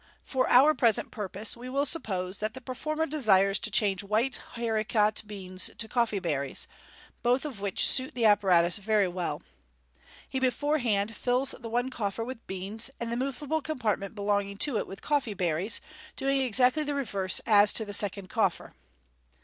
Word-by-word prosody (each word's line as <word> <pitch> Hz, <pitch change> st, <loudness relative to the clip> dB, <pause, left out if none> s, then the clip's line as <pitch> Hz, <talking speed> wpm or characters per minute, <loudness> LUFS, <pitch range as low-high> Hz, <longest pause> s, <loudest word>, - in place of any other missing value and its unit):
For 260 Hz, -2 st, -1 dB
our 275 Hz, +5 st, +6 dB
present 230 Hz, -7 st, +1 dB
purpose 205 Hz, 0 st, -4 dB
we 245 Hz, +2 st, -9 dB
will 275 Hz, +2 st, 0 dB
suppose 190 Hz, -, -1 dB
that 215 Hz, +2 st, -3 dB
the -, -, -7 dB
performer 305 Hz, +5 st, -3 dB
desires 200 Hz, -10 st, +3 dB
to 215 Hz, -, -1 dB
change 200 Hz, -1 st, +1 dB
white 220 Hz, +6 st, 0 dB, 0.2 s
haricot 220 Hz, -2 st, 0 dB
beans 185 Hz, -3 st, -1 dB
to 225 Hz, -, -2 dB
coffee 235 Hz, -2 st, 0 dB
berries, 145 Hz, -7 st, -1 dB, 0.6 s
both 250 Hz, +4 st, +1 dB
of 255 Hz, -10 st, -7 dB
which 200 Hz, -2 st, +3 dB
suit 260 Hz, -1 st, +5 dB
the 235 Hz, -2 st, 0 dB
apparatus 185 Hz, -5 st, +4 dB
very 210 Hz, -1 st, +1 dB
well. 180 Hz, -1 st, -4 dB, 0.8 s
He 265 Hz, -, -3 dB
beforehand 250 Hz, -6 st, 0 dB
fills 255 Hz, +3 st, 0 dB
the 230 Hz, -, -8 dB
one 245 Hz, +3 st, -1 dB
coffer 220 Hz, -2 st, -3 dB
with 245 Hz, 0 st, -8 dB
beans, 195 Hz, +6 st, -3 dB
and 235 Hz, 0 st, -4 dB
the -, -, -1 dB
moveable 275 Hz, +5 st, -2 dB
compartment 225 Hz, -9 st, -3 dB
belonging 200 Hz, -1 st, -1 dB
to 265 Hz, +1 st, +1 dB
it -, -, -4 dB
with 195 Hz, -, -10 dB
coffee 280 Hz, -8 st, -1 dB
berries, 180 Hz, +2 st, 0 dB, 0.3 s
doing 275 Hz, 0 st, 0 dB
exactly 255 Hz, +4 st, +3 dB
the 290 Hz, -1 st, -3 dB
reverse 200 Hz, -9 st, +1 dB
as 205 Hz, -2 st, +6 dB
to 220 Hz, -, +1 dB
the 205 Hz, -, -7 dB
second 200 Hz, -1 st, -1 dB
coffer. -, -, -1 dB
220 Hz, 165 wpm, -28 LUFS, 200-255 Hz, 0.8 s, our